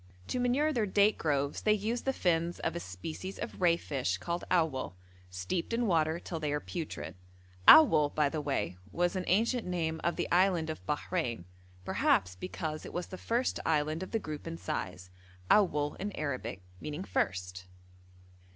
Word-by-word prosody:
To 250 - -1
manure 270 +5 +2
their 225 -5 +1
date 205 +2 +3
groves 145 -2 0
they 215 - +4
use 220 +3 -1
the 270 - 0
fins 170 -7 0
of 165 - -1
a - - -2
species 155 - -6
of - - -6
ray 170 -2 +5
fish 130 - -2
called 170 - -3
awwal, 155 - +1 0.3
steeped 95 - -3
in 235 +1 +1
water 160 -4 +2
till 170 -2 -5
they 150 -2 -1
are 150 - 0
putrid; 165 +1 -5 0.5
awwal, 155 - +9
by 150 -1 +3
the 155 +2 -2
way, 135 -10 -2
was 175 +2 0
an 185 - -2
ancient 225 +3 +2
name 160 -3 -1
of 170 - +1
the - - -1
Island 175 -3 +3
of 155 - -8
Bahrein, 150 - -2 0.4
perhaps 90 0 +2
because 155 - -5
it - - -9
was 175 0 -2
the 185 - -6
first 235 +6 -1
island 155 +1 +1
of 185 - -5
the 225 - 0
group 155 -8 -6
in 85 - -4
size, 90 +1 -5 0.4
awwal 150 -8 +3
in 205 +2 -3
Arabic 130 -10 -4 0.2
meaning 150 - -5
first. 90 - -2
165 Hz, 175 wpm, -31 LUFS, 145-190 Hz, 0.5 s, awwal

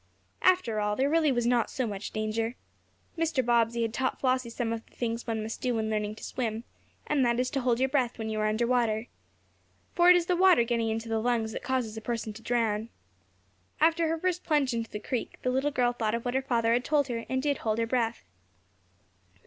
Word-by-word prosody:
After 360 -13 +3
all, 210 0 0
there 275 +4 +1
really 320 -3 +3
was 240 -2 0
not 240 -1 +2
so 260 - -2
much 205 -2 -5
danger. 225 +2 -2 0.6
Mr. 320 -6 0
Bobbsey 235 -1 +2
had 225 -1 -2
taught 260 +1 -1
Flossie 255 -2 +1
some 230 -1 -2
of 225 0 -5
the - - -27
things 230 0 -3
one 220 -2 -2
must 220 +1 -6
do 250 -2 0
when 220 -1 -1
learning 210 0 -1
to - - -13
swim, 230 -3 -3 0.4
and 290 -3 +1
that 240 0 +2
is 250 0 0
to 275 - -1
hold 245 -1 +1
your 265 - +3
breath 260 -3 0
when 220 -1 -4
you 220 -1 -2
are 215 - +1
under 220 +3 +1
water. 235 -2 +1 0.8
For 350 0 +5
it 360 - +9
is 350 -1 +2
the 360 - +1
water 365 -8 +5
getting 230 -1 0
into 225 +1 -3
the 225 -1 0
lungs 230 -2 0
that - - -5
causes 250 -5 -2
a - - -5
person 230 -2 -3
to 220 - -11
drown. 225 -2 0 0.9
After 330 +1 +3
her 325 +1 0
first 360 +1 -1
plunge 290 -6 +1
into 230 -1 -3
the 210 - -5
creek, 250 +2 -4
the 255 - +1
little 265 +3 +1
girl 245 -3 +1
thought 225 -2 -1
of 235 - -5
what 245 - -1
her 265 - +1
father 235 -4 +1
had 245 +1 +1
told 285 -1 +2
her, 230 -1 -3
and 260 - 0
did 285 -2 0
hold 215 -1 -1
her 230 - +1
breath. 230 - -1
235 Hz, 230 wpm, -28 LUFS, 225-260 Hz, 0.9 s, it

